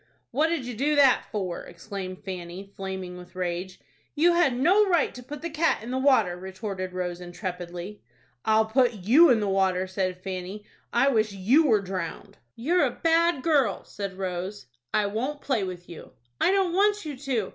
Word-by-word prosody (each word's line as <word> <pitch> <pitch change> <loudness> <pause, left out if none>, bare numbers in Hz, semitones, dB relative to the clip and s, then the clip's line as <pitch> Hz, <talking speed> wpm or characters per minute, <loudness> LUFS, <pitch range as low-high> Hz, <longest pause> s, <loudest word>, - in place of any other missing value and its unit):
"What 300 +6 +2
did 325 -6 -2
you 245 - -5
do 290 +6 +1
that 275 -3 +5
for?" 190 -5 -3
exclaimed 185 +1 -7
Fanny, 185 +1 -7
flaming 190 -2 -5
with 180 0 -13
rage. 180 0 -3 0.4
"You 340 +3 +4
had 310 -8 +3
no 365 +11 +5
right 345 -3 +2
to 250 - -9
put 285 +4 -9
the 340 - -2
cat 320 -6 +1
in 240 - -6
the 260 - -1
water," 240 -10 +3
retorted 190 0 -5
Rose, 180 -1 -4
intrepidly. 180 +1 -6 0.4
"I'll 220 0 +3
put 245 +2 +3
you 235 - +5
in 240 -3 +5
the 205 - 0
water," 190 -1 +1
said 185 -1 -2
Fanny. 190 +2 -6 0.3
"I 270 +4 +4
wish 215 -5 +1
you 245 - +3
were 215 -5 +4
drowned." 185 -3 -6 0.2
"You're 330 +9 +2
a 270 - +3
bad 330 -3 +3
girl," 275 - +2
said 200 -2 -6
Rose. 185 -2 -4 0.3
"I 210 - +2
won't 250 +9 -2
play 260 -9 0
with 180 -2 -6
you." 170 - -11 0.3
"I - - +4
don't 380 -3 +2
want 410 +1 +2
you 295 -2 -4
to. 250 -7 -2
210 Hz, 185 wpm, -26 LUFS, 185-275 Hz, 0.4 s, that